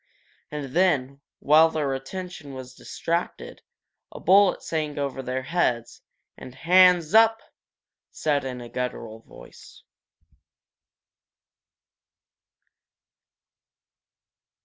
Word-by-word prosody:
And 145 -2 -7
then, 140 -7 +1 0.2
while 155 +3 +5
their 150 -4 -2
attention 145 +1 -8
was 130 -1 -9
distracted, 170 +6 -5 0.5
a - - -10
bullet 195 0 +4
sang 155 -2 -3
over 140 -2 -3
their 130 0 -4
heads. 125 -7 -2 0.4
And 125 - -11
"Hands 175 +1 +4
oop!" 225 0 +5 0.7
said 145 -2 -1
in 125 -2 -6
a 120 - -9
guttural 115 -3 -5
voice. - - -16
145 Hz, 85 wpm, -24 LUFS, 130-175 Hz, 0.7 s, while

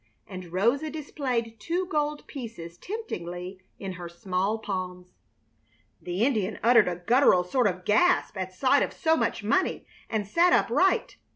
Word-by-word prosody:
And 185 -3 -9
Rosa 235 - +1
displayed 255 -7 -3
two 345 - -1
gold 300 -4 -2
pieces 220 -11 -8
temptingly 185 - -6 0.2
in 195 -1 -5
her 175 -1 -7
small 185 +4 -1
palms. 180 -4 -5 0.9
The 180 +6 0
Indian 215 -6 0
uttered 230 -4 +6
a 180 - -1
guttural 240 -7 +5
sort 240 +6 +1
of 185 -2 -3
gasp 355 +10 +3
at 185 -1 -4
sight 260 +9 +3
of - - -1
so 320 0 +2
much - - -1
money, - - 0 0.2
and 215 -2 -1
sat 345 - +4
upright. - - +2
215 Hz, 150 wpm, -27 LUFS, 185-280 Hz, 0.9 s, uttered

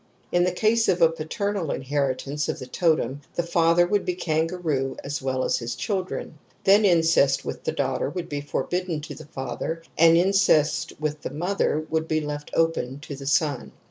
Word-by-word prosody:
In 175 0 +3
the 180 - +1
case 220 +5 +2
of 180 - +3 0.2
paternal 180 +2 -2
inheritance 140 +1 -2
of - - -2
the 130 - -7
totem 145 -2 0
the 175 - 0
father 170 0 +3
would 200 +2 +1
be 180 - -2
Kangaroo 160 -5 -1
as 145 +1 -4
well 130 -1 -1
as - - +1
the 115 - -7
children; 155 - -3 0.2
then 205 +2 +5
incest 165 -6 +3
with - - -6
the - - +1
daugh - - -1
ters 145 - -3
would 175 -2 -3
be 145 -3 -4
forbidden 175 +3 -2
to 145 - -7
the 140 - -11
father 145 +4 -4 0.2
and 165 0 +7
incest 175 -5 +3
with 150 -1 -2
the - - -4
mother 165 -2 -1
would 160 0 0
be 155 -1 +1
left 150 -1 -5
open 165 -5 0
to 145 - -7
the 135 0 -8
son. 145 -3 0
160 Hz, 185 wpm, -25 LUFS, 145-175 Hz, 0.2 s, and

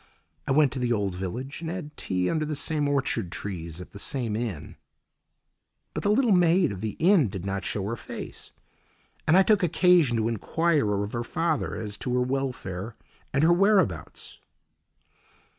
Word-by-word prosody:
I - - 0
went 145 0 +4
to 135 - -4
the 125 -1 0
old 100 -5 0
village 120 - -5
and 165 - -4
had 165 -4 -6
tea 90 -1 -1
under 155 - 0
the 155 0 -3
same 150 0 0
orchard 130 -9 0
trees 85 -5 -6
at 90 - -10
the 100 - -9
same 120 -2 -1
inn. 110 -10 -4 1.2
But - - -3
the 205 - 0
little 235 +2 +3
maid 175 - +4
of 95 -2 -6
the 110 -1 -3
inn 170 - +4
did 95 -1 -6
not 100 -1 -2
show 100 - -2
her 115 +3 -2
face, - - -8 0.8
and 160 +3 +6
I 190 - +7
took 210 0 +3
occasion 175 -7 +4
to 110 0 +1
enquire 115 - +1
of 105 - -5
her 120 0 -2
father 160 +4 -1
as 105 -2 -5
to 125 -1 -2
her 125 - +2
welfare 120 -6 -3 0.4
and 140 +2 +1
her 170 +2 +6
whereabouts. 180 - +1
125 Hz, 175 wpm, -26 LUFS, 100-165 Hz, 1.2 s, I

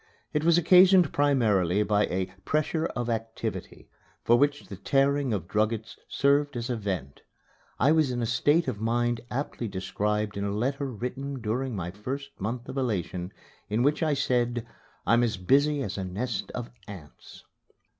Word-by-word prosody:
It 150 - 0
was 170 +1 +5
occasioned 180 0 +6
primarily 105 -10 +2
by 105 0 +2
a 95 0 -3
"pressure 155 - 0
of 120 -1 -2
activity," 115 -1 -4 0.4
for 120 - +5
which 145 +3 +1
the - - -8
tearing 140 -1 +1
of 95 -6 -2
druggets 110 +2 -1
served 140 -1 +2
as 120 +2 -3
a - - 0
vent. 95 - -4 0.6
I 140 - +4
was 155 -3 +3
in 125 -1 -2
a 120 - 0
state 145 +8 +2
of 110 -5 -3
mind 120 +1 0
aptly 125 -3 -3
described 105 +2 -2
in 100 - -2
a 100 - -1
letter 135 +5 -1
written 130 +4 -5
during 120 +3 -2
my 90 -3 -4
first 130 +8 -6
month 115 +4 -3
of 135 - -6
elation, 95 -6 -2 0.4
in 110 +4 +1
which 145 +4 +2
I 155 -3 +2
said, 120 -3 0 0.4
"I'm 115 +5 +4
as 115 -3 0
busy 140 +9 +2
as 100 -3 -4
a - - -2
nest 100 +4 -3
of 120 -1 -5 0.2
ants." 90 -8 -12
120 Hz, 165 wpm, -27 LUFS, 105-140 Hz, 0.6 s, occasioned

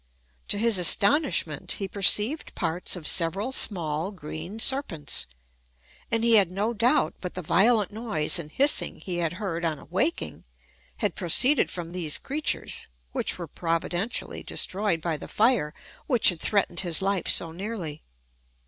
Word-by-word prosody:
To - - 0
his 225 -2 +3
astonishment, 205 - +3
he 195 - -5
perceived 210 +9 +2
parts 175 +4 -1
of 165 -5 -7
several 190 +8 +1
small 170 - +1
green 165 +3 -9
serpents: 220 - +1 0.8
and 230 0 -1
he 230 -1 +6
had 195 -4 +3
no 205 +5 -3
doubt 240 +7 +1
but 180 - -7
the 180 - -5
violent 205 +6 +2
noise 210 -8 +2
and 155 -2 -8
hissing 280 - +2
he 180 -2 -5
had 170 -1 -2
heard 180 -4 -5
on 160 -2 -2
awaking, 200 - -3 0.5
had 205 -5 -2
proceeded 245 - +4
from 170 -2 -7
these 170 -4 -1
creatures, 295 +3 -2 0.2
which - - -1
were - - -6
providentially 175 +5 -3
destroyed 190 -4 -1
by 165 -2 -3
the - - -10
fire 220 -9 +1 0.4
which 245 -5 +3
had 175 -3 -5
threatened 195 -5 0
his 175 -1 0
life 195 -1 -1
so 165 - +3
nearly. 175 -4 -7
190 Hz, 150 wpm, -25 LUFS, 165-225 Hz, 0.8 s, he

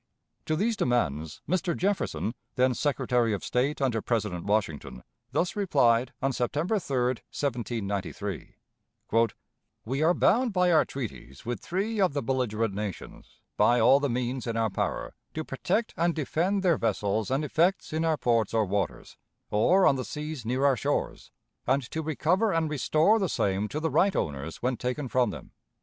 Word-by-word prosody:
To 155 - +1
these 220 +7 +1
demands 80 - -1
Mr. 185 -2 0
Jefferson, 190 - -1 0.2
then 130 0 +3
Secretary 125 -4 +1
of 100 - -3
State 135 +4 0
under 125 -5 +1
President 105 -8 -2
Washington, 80 - -1 0.3
thus 165 +6 0
replied 125 - +3
on 135 0 +1
September 150 - 0
3, 140 -6 -4 0.3
1793: 105 - -3 1.3
"We 135 +5 -2
are 165 +3 +4
bound 240 +1 +3
by 180 -1 +3
our 160 -2 +5
treaties 110 - -7
with 120 -3 -3
three 200 - -2
of 185 -6 +3
the 140 -2 -2
belligerent 115 -4 0
nations, 100 -2 -7 0.2
by 120 +1 +4
all 135 +5 +6
the 145 -1 0
means 125 +1 -2
in 115 -1 -2
our 110 -2 +1
power, - - -2 0.2
to 155 - -2
protect 215 - -1
and 170 0 +1
defend 175 +6 0
their 170 -5 +3
vessels 105 -1 0
and 135 +4 0
effects 170 +4 +1
in 160 +1 0
our 160 -2 +2
ports 115 -4 +1
or 110 -1 +3
waters, 100 +1 -3 0.3
or 180 - +4
on 135 - +4
the 130 - -2
seas 150 -2 -5
near 130 +4 0
our 140 -2 +5
shores, 115 - -2 0.4
and 135 +2 +2
to 160 - -2
recover 160 - +1
and 165 -3 0
restore 155 - +3
the 190 -4 0
same 100 -2 0
to 150 - -4
the 160 0 -1
right 185 +7 +3
owners 75 +5 -3
when 125 0 0
taken 125 +4 -3
from 125 -2 +2
them. - - -9
130 Hz, 165 wpm, -28 LUFS, 115-160 Hz, 1.3 s, all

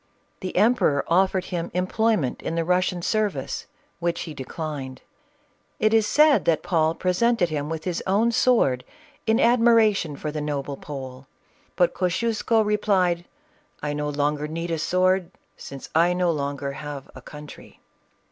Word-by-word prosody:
The 185 - -6
emperor 215 - +3
offered 185 +1 +2
him 170 -2 -4
employment 185 - 0
in 165 - -3
the 165 -1 0
Russian 180 0 +1
service, 205 -11 -1 0.3
which 170 0 -1
he 160 - -6
declined. 135 -2 -6 0.7
It 215 0 +2
is 220 -2 +4
said 300 +2 +4
that 165 -2 +2
Paul 160 -2 +1
presented 185 +1 +1
him 150 -1 -3
with 160 -1 -4
his 175 -1 -2
own 210 +5 +3
sword, 230 - +2 0.4
in 220 +1 +3
admiration 230 -9 +4
for 150 +2 -4
the 150 0 -4
noble 145 -1 -3
Pole, 130 -2 -8 0.5
but 175 - +2
Kosciusko 220 +4 +1
replied, 190 -5 +1 0.6
"I 145 0 -1
no 150 0 -2
longer 145 +1 -1
need 165 +2 -4
a 165 - -1
sword, 185 +2 +1 0.3
since 135 -1 -9
I 165 +2 +4
have 180 0 0
no 180 -1 +2
longer 140 -2 -3 0.4
a 130 - -11
country." 150 +3 -12
170 Hz, 145 wpm, -24 LUFS, 150-205 Hz, 0.7 s, is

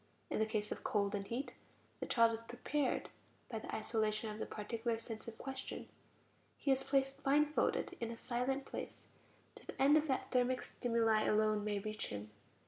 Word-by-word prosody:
In - - +1
the 220 - +3
case 215 -1 -1
of - - -4
cold 200 -1 +1
and 200 -1 -2
heat, 245 +7 -3 0.5
the - - -3
child 230 -2 +5
is 225 - -3
"prepared" 250 +4 -1 0.4
by 225 - -2
the - - -5
isolation 215 0 0
of 210 - -7
the - - -2
particular 225 +2 -2
sense 225 -1 -7
in 230 - -6
question; 265 +2 -5 0.7
he 280 - +1
is 265 0 +3
placed 270 0 +1
blindfolded 295 +2 +2
in 230 - -2
a 230 - -5
silent 255 +3 -1
place, - - -6 0.5
to - - -14
the - - -7
end 280 +3 +7
that 270 -4 +1
thermic 255 0 +2
stimuli 225 -2 +2
alone 215 0 +3
may 210 -1 0
reach 215 +2 -3
him. 105 +1 -6
230 Hz, 180 wpm, -37 LUFS, 215-265 Hz, 0.7 s, end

